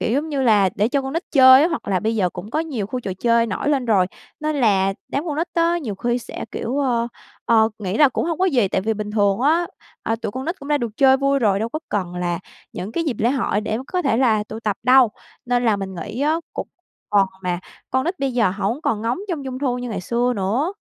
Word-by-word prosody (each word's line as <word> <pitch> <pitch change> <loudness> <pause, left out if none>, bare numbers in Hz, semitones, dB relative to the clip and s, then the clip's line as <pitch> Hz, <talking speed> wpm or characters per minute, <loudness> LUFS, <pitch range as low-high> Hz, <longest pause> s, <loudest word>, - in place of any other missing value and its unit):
kiểu 230 - 0
giống 290 +4 0
như 280 -3 -1
là 210 -6 +4
để 210 +2 +1
cho 275 +2 0
con 265 +1 -5
nít 330 - -1
chơi 260 0 +8
á, 330 - +3
hoặc 320 -10 -4
là 190 -2 +1
bây 220 +1 -1
giờ 185 -4 +1
cũng 185 +5 -8
có 305 - -1
nhiều 270 -11 -3
khu 250 +4 -4
trò 195 -5 -4
chơi 235 -1 +3
nổi 215 +6 -2
lên 280 -4 +1
rồi. 200 -5 +3 0.3
Nên 305 0 -1
là 195 -6 +2
đám 285 +4 -2
con 300 -3 -2
nít 330 +3 0
á, 335 0 +2
nhiều 240 -11 -4
khi 240 +5 -1
sẽ 245 - -7
kiểu, 255 +5 -3
ơ, 240 -4 +1 0.4
ờ, 220 -1 +4
nghĩ 195 -2 -3
là 295 -2 +7
cũng 260 - -2
hông 335 -2 -2
có 375 - +2
gì, 255 - +2
tại - - 0
vì 220 +3 -1
bình 210 0 -5
thường 205 -1 +2
á, 320 +6 +3 0.4
à, 225 - -1
tụi - - -3
con 260 +3 -5
nít 340 +5 -3
cũng 280 - -10
đã 295 -1 +2
được 230 -4 -4
chơi 265 -1 +6
vui 275 +1 +1
rồi, 205 -6 +2
đâu 220 +2 -2
có 305 - -4
cần 185 -4 -2
là 175 -1 -2 0.3
những 195 +4 -6
cái 330 - -1
dịp 275 -8 -1
lễ 235 +3 +2
hội 240 -6 0
để 220 +1 -2
có 365 +3 -1
thể 275 -7 +1
là 225 -4 +2
tụ 220 +1 -8
tập 210 -3 -1
đâu. 255 -1 +6 0.4
Nên 245 0 +1
là 220 -3 +3
mình 195 -1 -5
nghĩ 210 +7 -6
á, 305 +3 +2 0.2
cũng - - -5
một - - -56 0.3
phần 195 - +5 0.2
mà 180 -2 -1 0.3
con 260 +1 +1
nít 355 +3 -2
bây 275 -1 -1
giờ 230 -6 +2
hổng 200 +7 -2
còn 215 -1 -1
ngóng 230 +6 -1
trông 320 -6 -3
Trung 260 -1 -5
thu 255 -3 -1
như 245 0 -5
ngày 220 - -3
xưa 240 +6 0
nữa. 225 - 0
240 Hz, 275 wpm, -21 LUFS, 210-275 Hz, 0.4 s, chơi